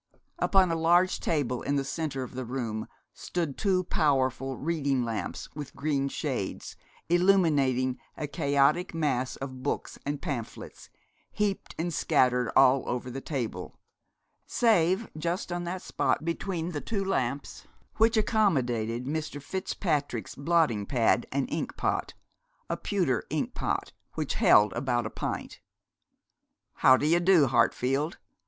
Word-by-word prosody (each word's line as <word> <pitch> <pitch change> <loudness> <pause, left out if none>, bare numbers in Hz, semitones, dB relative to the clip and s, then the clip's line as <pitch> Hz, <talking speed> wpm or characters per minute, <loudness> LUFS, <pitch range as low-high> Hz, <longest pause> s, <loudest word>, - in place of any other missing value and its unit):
Upon 190 -3 +4
a - - +1
large 175 +3 +3
table 130 -6 -1
in 140 - -1
the 140 - +1
centre 140 -2 -3
of 130 - -9
the 130 0 -4
room 115 -3 -4 0.3
stood 165 -6 -3
two 190 -3 +1
powerful 135 - 0
reading 140 -5 0
lamps 110 -6 -4
with 145 -2 -8
green 140 -2 0
shades, - - -4 0.3
illuminating 150 -9 +3 0.2
a 155 - -3
chaotic 145 +5 +1
mass 135 -5 0
of 130 -1 -7
books 145 - -3
and 145 0 -3
pamphlets, 120 -6 -6 0.4
heaped 205 -2 -2
and 170 +1 -2
scattered 125 -6 +2
all 130 +1 +6
over 125 +1 -3
the 135 +2 -5
table, 130 -7 -4 0.7
save 195 -2 +2
just 170 +4 -3
on 175 0 -3
that 180 +1 -4
spot - - 0
between 170 0 -2
the 150 -4 -4
two 200 -4 -2
lamps, 140 -7 -2 0.3
which 225 +1 +4
accommodated 125 - +1
Mr. 155 +1 -3
Fitzpatrick's 145 - -2
blotting 140 -9 +1
pad 120 -3 +2
and 140 0 0
inkpot, 160 - -2 0.6
a - - +1
pewter 175 - 0
inkpot - - -2 0.2
which - - -2
held 105 -2 +5
about 120 -1 -1
a - - -4
pint. - - -5 1.2
'How 130 - +6
d'ye 160 +5 +3
do, 175 -4 +5
Hartfield? 130 +5 +1
145 Hz, 130 wpm, -28 LUFS, 130-170 Hz, 1.2 s, all